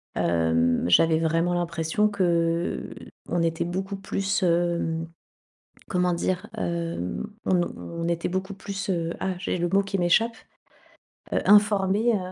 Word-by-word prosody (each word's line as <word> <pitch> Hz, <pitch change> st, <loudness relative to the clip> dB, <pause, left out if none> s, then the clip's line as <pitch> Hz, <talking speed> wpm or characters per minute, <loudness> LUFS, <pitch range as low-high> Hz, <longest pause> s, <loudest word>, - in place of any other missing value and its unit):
hem, 80 Hz, 0 st, +2 dB
j'avais 160 Hz, -, +4 dB
vraiment 165 Hz, +2 st, +1 dB
l'impression 170 Hz, +3 st, 0 dB
qu'on 170 Hz, -2 st, -1 dB
était 165 Hz, 0 st, 0 dB
beaucoup 190 Hz, +3 st, -3 dB
plus, 195 Hz, +1 st, -2 dB
hem, 170 Hz, -1 st, +1 dB, 0.8 s
comment 180 Hz, -1 st, +1 dB
dire? 180 Hz, +1 st, -2 dB
Hem, 170 Hz, -, -3 dB, 0.2 s
on 190 Hz, -, +3 dB
nous 175 Hz, -1 st, +1 dB
on 170 Hz, 0 st, -5 dB
était 170 Hz, -1 st, -1 dB
beaucoup 190 Hz, +2 st, -3 dB
plus, 195 Hz, 0 st, -5 dB
heu, 170 Hz, -2 st, -1 dB
ah 190 Hz, -, -1 dB
j'ai 185 Hz, -, -2 dB
le 175 Hz, 0 st, 0 dB
mot 195 Hz, +2 st, +3 dB
qui 195 Hz, 0 st, -2 dB
m'échappe, 220 Hz, +7 st, +2 dB, 1.0 s
heu, -, -, +2 dB
informés, 205 Hz, +2 st, +4 dB
heu, -, -, +2 dB
175 Hz, 135 wpm, -25 LUFS, 165-195 Hz, 1.0 s, j'avais